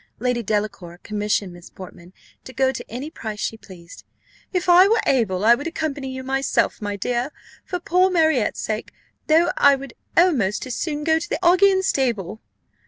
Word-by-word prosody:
Lady 250 0 -1
Delacour 205 -5 -3
commissioned 210 -3 -2
Miss 175 0 -13
Portman 180 -1 -12 0.3
to - - -10
go 265 0 +2
to 260 - -7
any 260 +7 -6
price 215 -9 -7
she 225 - -2
pleased. 180 -5 -14 0.5
"If 365 -1 -2
I 360 +2 +7
were 455 +2 +3
able, 210 -7 +1
I 235 - +7
would 285 +7 -2
accompany 295 -5 -4
you 260 0 -6
myself, 270 -2 0
my 205 -1 -3
dear, 240 +6 -2 0.3
for 360 - -4
poor 365 +2 +2
Marriott's 315 - +1
sake, 215 0 -4 0.4
though 330 +2 +4
I 280 -1 +6
would 270 -2 -9 0.2
almost 265 - +2
as 255 - -5
soon 300 -2 -3
go 320 +1 +2
to 325 - -7
the - - -1
Augean 380 +2 +4
stable." 225 - -1
260 Hz, 175 wpm, -22 LUFS, 210-320 Hz, 0.5 s, I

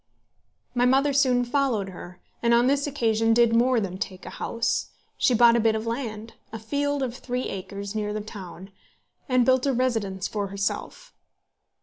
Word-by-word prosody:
My 245 0 +2
mother 275 +3 +3
soon 255 -3 +3
followed 245 -6 0
her, 180 -1 -10 0.2
and 235 0 +4
on 240 +1 +4
this 280 +2 +1
occasion 225 -5 +1
did 235 -1 +4
more 245 +1 +3
than 190 -3 -4
take 190 -3 -5
a - - -7
house. 230 0 -2 0.3
She 250 - +2
bought 235 0 +6
a - - +3
bit 225 -1 +2
of 220 +1 -3
land, 230 -2 -4 0.2
a 225 - -5
field 285 +5 -1
of 245 -2 -3
three 250 0 -3
acres 200 +1 -6
near 210 -1 -2
the 215 - -3
town, 195 -2 -10 0.6
and 255 -1 +3
built 260 +1 +3
a 275 - +2
residence 225 -7 -1
for 205 -2 -3
herself. 200 - -4
230 Hz, 180 wpm, -25 LUFS, 210-255 Hz, 0.6 s, bought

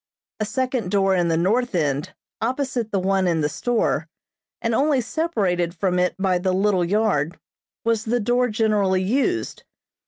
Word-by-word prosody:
A 215 - 0
second 255 -3 -2
door 195 0 +2
in 175 -2 +2
the 165 -1 +1
north 220 +6 +1
end, 145 -3 -1 0.3
opposite 250 -1 -1
the 200 - +1
one 190 0 +1
in 165 -2 +1
the 150 - +2
store, 240 +9 0 0.5
and 230 0 -1
only 280 +3 +2
separated 200 - -1
from 180 +1 0
it 180 0 +1
by 190 -2 +1
the 185 +1 0
little 190 -1 +2
yard 175 -5 0 0.5
was 230 -1 +1
the 240 +2 +1
door 245 +3 +2
generally 210 -4 +1
used. 275 - -1
205 Hz, 160 wpm, -22 LUFS, 180-240 Hz, 0.5 s, door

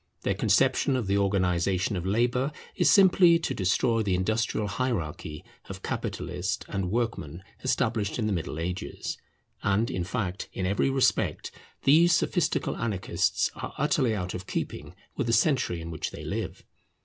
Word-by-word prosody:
Their - - +1
conception 135 - +2
of 125 -4 -1
the 100 +1 +1
organization 95 -1 +1
of 90 0 -3
labour 120 +6 +1 0.2
is - - +3
simply 185 -3 +6
to 165 - -2
destroy 110 +4 +1
the 100 -4 +1
industrial 110 +3 0
hierarchy 85 - -3 0.2
of - - -8
capitalist - - -3
and 95 -2 -2
workman 100 -7 -2 0.2
established 115 -5 0
in 115 - -1
the 105 - 0
Middle 85 -3 -3
Ages; 90 +3 -4 0.4
and, 100 +3 +1
in 90 - -2
fact, 95 -2 -3
in 95 - -2
every 100 +7 +1
respect 135 -1 +1 0.3
these 165 +5 +6
sophistical 175 0 0
anarchists 105 -6 0
are - - -7
utterly 135 -5 +2
out 90 -2 -3
of 90 +1 -6
keeping - - -4 0.2
with - - -1
the 115 - +1
century 115 - +2
in 85 0 -6
which 80 - -3
they - - -9
live. - - -4
105 Hz, 155 wpm, -27 LUFS, 90-125 Hz, 0.4 s, simply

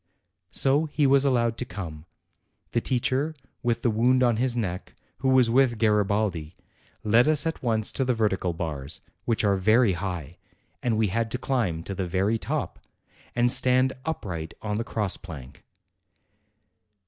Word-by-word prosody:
So 140 +4 +2
he 150 -1 0
was 140 0 +5
allowed 120 -4 +2
to - - -1
come. 85 -7 -7 0.7
The 120 - +1
teacher 135 +5 0 0.3
with 120 -2 -1
the 120 - +3
wound 125 +4 +3
on 120 -3 +3
his 125 0 0
neck, 90 -5 -4 0.2
who 130 - +1
was 130 -2 +5
with 125 -2 +3
Garibaldi, 105 -6 +1 0.5
led 115 +5 +4
us 155 -1 +2
at 165 - -2
once 110 -3 0
to 135 - -1
the 125 -1 +1
vertical 95 -5 0
bars, 75 -4 -5 0.2
which 115 -2 0
are 100 -2 +3
very 110 +2 +4
high, 85 -3 -5 0.4
and 115 -3 0
we 110 -2 +2
had 115 +4 -1
to 125 - -2
climb 115 -12 -1
to 100 - -5
the 95 -2 -3
very 95 +5 +1
top, - - -3 0.6
and 120 0 +3
stand 130 +1 +3
upright 85 - -4
on 105 0 -2
the - - -1
cross 105 -4 -1
plank. 70 -8 -11
110 Hz, 160 wpm, -26 LUFS, 95-125 Hz, 0.7 s, was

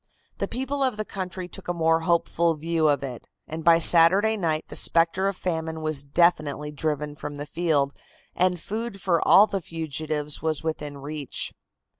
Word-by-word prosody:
The - - -1
people 270 +2 -4
of 255 -5 +1
the 215 - -3
country 185 -2 -6
took 195 +1 -9
a 175 - -2
more 165 -1 +2
hopeful 170 0 +1
view 160 +1 0
of 140 -1 +1
it, 125 -3 -7 0.2
and 160 +1 -6
by 165 0 +6
Saturday 180 +6 +6
night 160 -6 -2
the - - -9
spectre 170 +3 +3
of 195 -2 -2
famine 160 -2 -3
was 155 -3 +1
definitely 150 -1 +1
driven 150 -1 -3
from 150 -1 -7
the 145 0 -6
field 150 -4 0 0.4
and 180 0 +1
food 220 +2 -5
for 175 -3 +1
all 205 - +8
the 195 -2 -4
fugitives 155 -2 -3
was 160 -1 -1
within 150 -3 -4
reach. 145 0 -4
165 Hz, 175 wpm, -25 LUFS, 150-180 Hz, 0.4 s, all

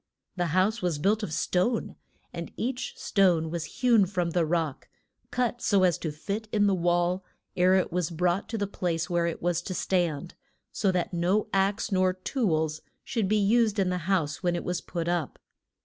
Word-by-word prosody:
The 175 -2 0
house 215 +5 +2
was 175 -4 0
built 205 +8 +1
of 210 - -4
stone, 185 +9 0 0.4
and - - -6
each 250 +1 -3
stone 175 -5 +2
was 170 -2 -3
hewn 230 -4 +3
from 175 -2 -1
the 170 -1 +1
rock, 160 -4 -2 0.4
cut 245 -1 -1
so 200 -2 +3
as 175 -4 +3
to 160 - -3
fit 200 +8 -4
in 205 -1 +3
the 200 - +3
wall 175 +1 +1 0.3
ere 185 +1 +4
it 185 - +1
was 175 -2 0
brought 175 +3 0
to 225 - -3
the 205 - 0
place 175 -4 -2
where 170 -1 +2
it 165 - -4
was 175 -1 +1
to 185 +1 -5
stand, 175 -4 -1 0.4
so 195 - +1
that 180 0 -1
no 180 +5 +1
ax 195 +3 +1
nor 185 -1 +3
tools 165 - -1 0.2
should 225 -5 -1
be 215 +2 +2
used 215 +1 +3
in 190 -2 +2
the 180 - -1
house 160 -6 0
when 175 -2 +1
it - - -3
was 180 -1 -2
put 170 -2 -4
up. 175 -4 -1
180 Hz, 195 wpm, -27 LUFS, 170-200 Hz, 0.4 s, ere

